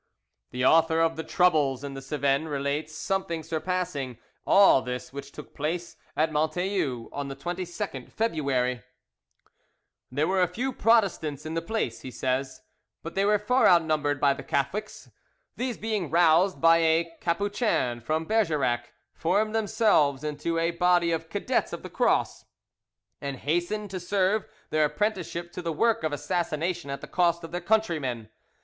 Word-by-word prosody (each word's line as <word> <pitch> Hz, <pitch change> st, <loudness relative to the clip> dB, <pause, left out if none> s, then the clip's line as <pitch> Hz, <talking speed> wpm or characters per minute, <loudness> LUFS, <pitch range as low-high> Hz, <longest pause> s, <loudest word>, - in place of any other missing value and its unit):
The 125 Hz, 0 st, -2 dB
author 165 Hz, +2 st, +4 dB
of 165 Hz, 0 st, +2 dB
The 160 Hz, -, -4 dB
Troubles 150 Hz, -8 st, +2 dB
in 140 Hz, -1 st, -5 dB
the 135 Hz, -, -7 dB
Cevennes 140 Hz, +2 st, 0 dB
relates 145 Hz, +1 st, -2 dB
something 170 Hz, -2 st, -2 dB
surpassing 160 Hz, -5 st, -3 dB, 0.3 s
all 195 Hz, -9 st, +6 dB
this 125 Hz, +1 st, -6 dB
which 140 Hz, 0 st, -8 dB
took 150 Hz, -, -11 dB
place 170 Hz, +3 st, -3 dB, 0.2 s
at 155 Hz, +1 st, +2 dB
Montelus 155 Hz, -, -1 dB
on 145 Hz, -1 st, -4 dB
the 135 Hz, -, -6 dB
22nd 175 Hz, -, -5 dB
February 135 Hz, -, 0 dB, 1.3 s
"There 145 Hz, +5 st, 0 dB
were 190 Hz, 0 st, +2 dB
a 180 Hz, -, +4 dB
few 245 Hz, +9 st, -3 dB
Protestants 185 Hz, -, +2 dB
in 155 Hz, -, -4 dB
the 165 Hz, -, -1 dB
place," 170 Hz, -, -3 dB
he 130 Hz, -, -7 dB
says, 130 Hz, +1 st, -2 dB, 0.4 s
"but 165 Hz, -, -6 dB
they 195 Hz, +1 st, +1 dB
were 210 Hz, +1 st, +4 dB
far 250 Hz, +6 st, +3 dB
outnumbered 155 Hz, -4 st, +3 dB
by 140 Hz, -1 st, +4 dB
the 140 Hz, -, -8 dB
Catholics; 205 Hz, +12 st, -3 dB, 0.4 s
these 245 Hz, -2 st, -3 dB
being 210 Hz, -7 st, -2 dB
roused 170 Hz, +3 st, +4 dB
by 165 Hz, 0 st, +6 dB
a 165 Hz, +1 st, +2 dB
Capuchin 190 Hz, -, 0 dB
from 155 Hz, +6 st, -1 dB
Bergerac, 150 Hz, -, 0 dB, 0.2 s
formed 215 Hz, +6 st, 0 dB
themselves 210 Hz, -, +2 dB
into 150 Hz, +2 st, -2 dB
a 165 Hz, +1 st, +1 dB
body 175 Hz, 0 st, +3 dB
of 165 Hz, 0 st, -2 dB
'Cadets 205 Hz, +6 st, -1 dB
of -, -, -6 dB
the -, -, -8 dB
Cross,' -, -, +1 dB, 0.8 s
and 140 Hz, -1 st, -4 dB
hastened 175 Hz, +9 st, -2 dB
to 185 Hz, -, -4 dB
serve 195 Hz, +3 st, +1 dB, 0.3 s
their 155 Hz, 0 st, +3 dB
apprenticeship 175 Hz, 0 st, -2 dB
to 180 Hz, -, -6 dB
the 170 Hz, -1 st, -2 dB
work 230 Hz, +8 st, +2 dB
of 155 Hz, -, 0 dB
assassination 165 Hz, +1 st, -2 dB
at 140 Hz, -, -4 dB
the -, -, -8 dB
cost 170 Hz, -1 st, +1 dB
of 165 Hz, -, -8 dB
their 175 Hz, +1 st, -3 dB
countrymen. 160 Hz, -, 0 dB
165 Hz, 155 wpm, -27 LUFS, 145-185 Hz, 1.3 s, all